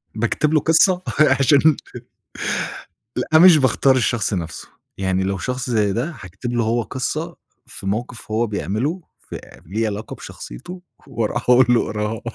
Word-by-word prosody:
باكتب 120 +7 0
له 155 - +5
قصة، 170 +4 +3 0.2
عشان 140 +1 +4 1.4
لأ 140 +5 +3
مش 175 0 +8
باختار 135 -1 +3
الشخص 120 -3 0
نَفْسه 85 -3 -5 0.3
يعني 95 -1 0
لو 95 0 -1
شخص 125 +6 -3
زي 105 -4 +2
ده، 135 - -2
هاكتب 100 +6 -6
له 120 -1 +1
هو 115 +2 +1
قصة 155 +8 -4 0.3
في - - -10
موقف 115 +4 -4
هو 110 +2 +1
بيعمله 110 - -2 0.2
فليه 110 +4 -6
علاقة 105 0 -5
بشخصيته 180 - -10 0.2
وأروح 120 -1 -2
أقول 125 +1 +6
له 120 -1 +3
اقراها 105 +1 -3
120 Hz, 140 wpm, -20 LUFS, 105-140 Hz, 1.4 s, مش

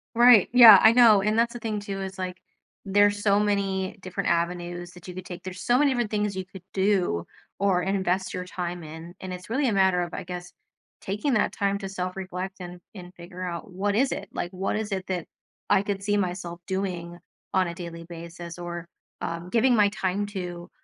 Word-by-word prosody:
Right, 240 -4 +7
yeah, 240 -3 +11
I 220 - +8
know, 230 -4 +7
and 215 +2 +1
that's 235 +1 +2
the 240 - -6
thing 220 -2 -3
too, 200 -1 -5
is, 190 0 -6
like, 180 -1 -4 0.5
there's 205 +1 +3
so 200 -1 +4
many 195 -2 0
different 185 +1 -3
avenues 175 +1 -2
that 180 0 -14
you 180 - -8
could 185 0 -7
take. 180 -1 -8
There's 185 0 -7
so 245 +5 +3
many 290 -1 +4
different 240 -4 -1
things 210 -2 -1
you 190 - -4
could 185 0 -12
do 190 - +1 0.3
or 190 -2 +2
invest 190 0 -1
your 180 0 -4
time 175 -1 -5
in, 160 +3 -10
and 185 -1 -5
it's 180 +3 -9
really 265 +3 +1
a 225 - +1
matter 190 -2 +3
of, 175 -1 -4
I - - -4
guess, 180 0 -7 0.5
taking 210 +9 -1
that 215 - +2
time 200 -2 0
to 195 -1 -5
self-reflect 185 0 -5
and 180 0 -8 0.2
and 180 -2 -10
figure 175 +1 -10
out 175 +1 -5
what 200 +2 -1
is 265 +4 +2
it, - - -5
like, 175 - -4
what 190 +1 -2
is 215 0 -3
it 190 -1 -3
that 180 -3 -2 0.5
I 190 - +5
could 200 -1 -3
see 205 +1 +1
myself 175 -3 -3
doing 180 -3 -3 0.4
on 185 -1 +3
a 170 - -4
daily 170 -2 -8
basis 170 0 -9
or, 175 -1 -6 0.3
um, 170 +1 -4
giving 240 +4 +3
my 210 -2 +5
time 200 0 -1
to 180 -4 -6
190 Hz, 210 wpm, -26 LUFS, 175-205 Hz, 0.5 s, yeah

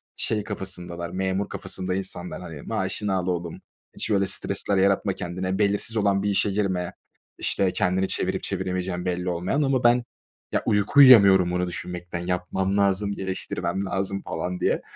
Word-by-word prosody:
şey 105 -2 -1
kafasındalar 90 -4 -6
memur 95 +2 -2
kafasında 95 0 -3
insanlar 90 -2 -4
hani 80 -5 -8
maaşını 100 +5 -2
al 90 -1 -1
oğlum 85 -2 -3 0.3
hiç - - -2
böyle 100 -2 +2
stresler 100 +1 +1
yaratma 100 0 +2
kendine, 95 +2 -3
belirsiz 105 +2 +2
olan 100 -2 +2
bir 105 - +1
işe 100 0 +1
girme, 95 -3 -1 0.4
işte 95 -2 +1
kendini 90 +1 +1
çevirip - - -2
çeviremeyeceğin 90 -1 -3
belli 90 0 -1
olmayan, 90 - -1
ama 135 -3 +1
ben 120 0 +4 0.5
ya - - 0
uyku 105 +7 +2
uyuyamıyorum 100 -9 +8
bunu 90 0 0
düşünmekten 90 0 -6
yapmam 90 +2 -1
lazım, 100 0 +1
geliştirmem 95 0 -3
lazım 100 0 -2
falan 90 +2 -4
diye. - - +1
95 Hz, 150 wpm, -25 LUFS, 90-100 Hz, 0.5 s, uyuyamıyorum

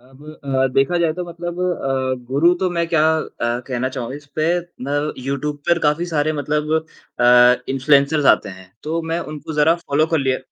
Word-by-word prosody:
अब 130 +3 -19 0.2
अ, 135 -1 +1
देखा 135 +6 +2
जाए 165 -2 +1
तो 180 +2 -5
मतलब 175 0 -7
अ, 135 -7 -1
गुरु 145 +7 +3
तो 190 - +1
मैं 170 -1 -1
क्या 165 -3 +2
अ, 120 -6 -3
कहना 130 -1 -2
चाहूँगा 130 0 -5
इसपे, 145 +1 -5 0.4
ना 140 - -3 0.3
यूट्यूब 140 +2 -3
पर 170 0 +4
काफ़ी 150 +2 0
सारे 155 -2 0
मतलब 150 +1 -2 0.5
अ, 125 0 +6
इन्फ्लुएंसर्स 140 +2 +2
आते 105 - -9
हैं, 95 -1 -12
तो 160 +2 -2
मैं 165 +1 -2
उनको 155 +1 -7
ज़रा 150 +2 +3
फॉलो 150 +2 +2
कर 160 0 0
लिया 130 -2 0
145 Hz, 185 wpm, -20 LUFS, 130-160 Hz, 0.5 s, अ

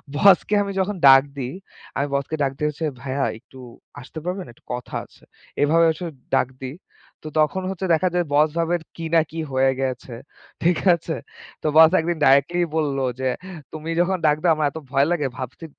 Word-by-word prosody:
বসকে 195 +6 +5
আমি 200 - -4
যখন 195 +2 0
ডাক 135 0 +9
দিই, 130 0 -4 0.4
আমি 140 +1 0
বসকে 140 +3 -1
ডাক 135 - +1
দিয়েছি, 150 +1 -2 0.2
"ভাইয়া 135 +1 -1
একটু 130 +2 -17 0.4
আসতে 140 +4 -9
পারবেন? 180 +1 -3
একটু - - -29
কথা 125 -1 -6
আছে।" - - -23 0.4
এভাবে 165 +3 +4
আসলে 165 +1 -6 0.2
ডাক 130 - +2
দিই। 130 +2 -6 0.5
তো - - -7
তখন 155 +5 +2
হচ্ছে 190 0 -4
দেখা 180 +3 +2
যায়, 175 -1 +1
বস 150 +2 +4
ভাবে 165 +1 +1 0.2
কি 165 - -5
না 165 - +6
কি 165 - -6
হয়ে 135 0 +3
গেছে, 130 -1 -3 0.5
ঠিক 170 0 +3 0.2
আছে। 165 -1 -5 0.5
তো - - 0
বস 160 0 +9
১ 160 - -2
দিন 170 - -1
ডাইরেক্‌ট্‌লিই 140 +6 +4
বলল 145 -4 0 0.2
যে, 130 - 0 0.4
“তুমি 155 +1 -6
যখন 185 +1 +1
ডাক 150 -1 +4
দাও, 170 -2 +5
আমার 155 -1 +1
এত 160 - -9
ভয় 140 +1 +3
লাগে। 155 -5 +1
ভাবছি 130 +6 -7
155 Hz, 190 wpm, -22 LUFS, 135-170 Hz, 0.5 s, ডাক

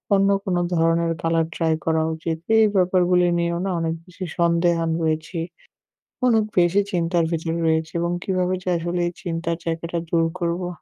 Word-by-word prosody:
অন্য 195 0 +3 0.2
কোনো 180 -2 0 0.2
ধরনের 165 0 +2
কালার 165 0 +2
ট্রাই 160 -1 +1
করা 160 -1 +2
উচিত?" 160 0 -3 0.2
এই 220 - +6
ব্যাপারগুলো 180 -1 +3
নিয়েও 170 0 0
না - - -1
অনেক 165 0 -1
বেশি 185 +1 -7
সন্দেহান 170 -1 +2
রয়েছি। 160 +2 -2 0.9
অনেক 225 -3 +4 0.2
বেশি 175 +3 +4
চিন্তার 170 -1 +1
ভেতরে 165 0 -2
রয়েছি 160 0 +1
এবং 170 0 0
কিভাবে 185 -1 0
যে 185 - -2
আসলে 175 +1 -2
এই 175 - -4
চিন্তার 170 -1 -2
জায়গাটা 170 +1 -3
দূর 165 -1 +2 0.2
করবো 175 +1 -1
170 Hz, 160 wpm, -22 LUFS, 165-180 Hz, 0.9 s, এই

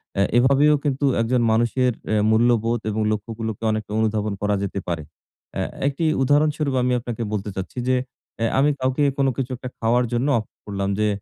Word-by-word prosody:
অ্যা 100 - +3
এভাবেও 140 +4 +5
কিন্তু 145 -1 0 0.2
একজন 120 +2 +1
মানুষের 120 +3 +2 0.2
অ্যা 110 -1 +2
মূল্যবোধ 115 +1 +2
এবং 110 +1 -1
লক্ষ্যগুলোকে 110 +1 -4
অনেকটা 110 -1 -3
অনুধাবন 110 -1 0
করা 105 0 +1
যেতে 100 0 -3
পারে। 85 -3 -2 0.5
অ্যা - - -1 0.2
একটি 145 +4 -1 0.2
উদাহরণস্বরূপ 145 0 +2
আমি 125 0 +1
আপনাকে 120 -1 -4
বলতে 105 0 -2
চাচ্ছি 95 +6 -6
যে, 130 - +4 0.4
অ্যা 115 - +1
আমি 145 +2 +4
কাউকে 130 +3 +1
কোন 135 -1 +2
কিছু 130 -1 -2
একটা 125 - -7
খাওয়ার 120 +2 +2
জন্য 120 +4 +1
অফ 110 - -6 0.2
করলাম 100 -1 -2
যে, 105 - +2
120 Hz, 175 wpm, -22 LUFS, 105-130 Hz, 0.5 s, এভাবেও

